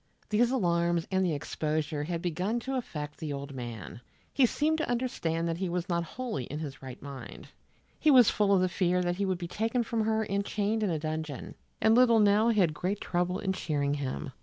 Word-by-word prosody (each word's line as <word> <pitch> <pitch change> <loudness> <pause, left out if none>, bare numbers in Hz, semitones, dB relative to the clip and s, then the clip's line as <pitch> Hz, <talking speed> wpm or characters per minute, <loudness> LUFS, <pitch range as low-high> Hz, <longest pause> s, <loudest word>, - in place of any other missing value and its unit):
These 235 +3 +3
alarms 170 -7 +1
and 190 0 +2
the 170 -4 +1
exposure 150 0 -2
had 170 0 -3
begun 185 +7 -1
to 265 +3 -4
affect 150 - -4
the 155 -3 -4
old 140 0 -6
man. 120 -3 -7 0.3
He 265 -3 +5
seemed 310 +5 +1
to 315 - -1
understand 170 -10 -1
that 165 0 -2
he 190 -2 -1
was 175 +1 -2
not 170 -2 0
wholly 220 - -4
in 145 - -6
his 150 -4 -6
right 130 -2 -8
mind. 140 -2 -9 0.5
He 310 - +3
was 255 -6 +8
full 205 -1 +2
of 195 -2 +5
the 185 - +3
fear 180 0 +1
that 175 0 -1
he 200 - 0
would 185 -1 0
be 175 -1 -5
taken 225 +6 0
from 225 -1 -1
her 220 0 +1
and 200 -1 -1
chained 210 +2 -1
in 210 - +1
a 165 - 0
dungeon, 155 -2 -4 0.3
and 220 - +4
little 235 -1 +6
Nell 210 +2 +4
had 190 -8 +3
great 185 +7 -2
trouble 180 +1 -1
in 190 -1 -1
cheering 145 -5 -1
him. 135 -2 -3
180 Hz, 215 wpm, -29 LUFS, 155-220 Hz, 0.5 s, was